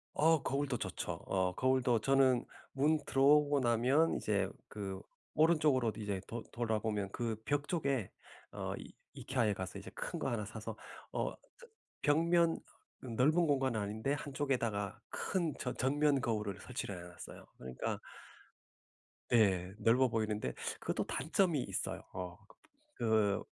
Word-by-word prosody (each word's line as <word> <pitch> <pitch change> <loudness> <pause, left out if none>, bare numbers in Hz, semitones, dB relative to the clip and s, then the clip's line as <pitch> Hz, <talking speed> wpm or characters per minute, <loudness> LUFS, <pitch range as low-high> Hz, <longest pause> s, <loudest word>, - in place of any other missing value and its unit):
어 160 -1 +4
거울도 140 -2 0
좋죠. - - -3
어 95 -1 +1
거울도 130 -3 +3
저는 130 -1 +4 0.3
문 150 +3 +2
들어오고 145 +1 +5
나면 125 +7 +3
이제 100 -3 +1 0.2
그 95 -2 -5 0.3
오른쪽으로 150 -7 +4
이제 100 -3 -3
돌 115 0 -5
돌아보면 110 -3 -1
그 115 -2 -2
벽 145 0 0
쪽에 140 - 0 0.4
어 - - -4
이 - - -9 0.3
IKEA에 120 -6 +1
가서 95 -1 -5
이제 - - -9
큰 - - -5
거 - - -1
하나 110 -3 -2
사서 110 0 -6 0.4
어 - - -1 0.2
저 475 -1 -15 0.4
벽면 165 +2 +3 0.4
넓은 145 +8 +2
공간은 135 -5 +2
아닌데 110 +6 -1
한쪽에다가 130 -8 -1
큰 170 -5 -1
전 125 - -3
전면 145 +1 +3
거울을 105 -5 -1
설치를 100 - -5
해 90 - -9
놨어요. 85 - -11
그러니까 65 0 -4 1.3
네. 95 -5 +3
넓어 125 +3 +4
보이는데 105 - -1 0.3
그것도 - - -1
단점이 160 0 +1
있어요. - - -3
어 90 0 -5 0.6
그 110 -3 +2
125 Hz, 275 characters per minute, -34 LUFS, 105-145 Hz, 1.3 s, 들어오고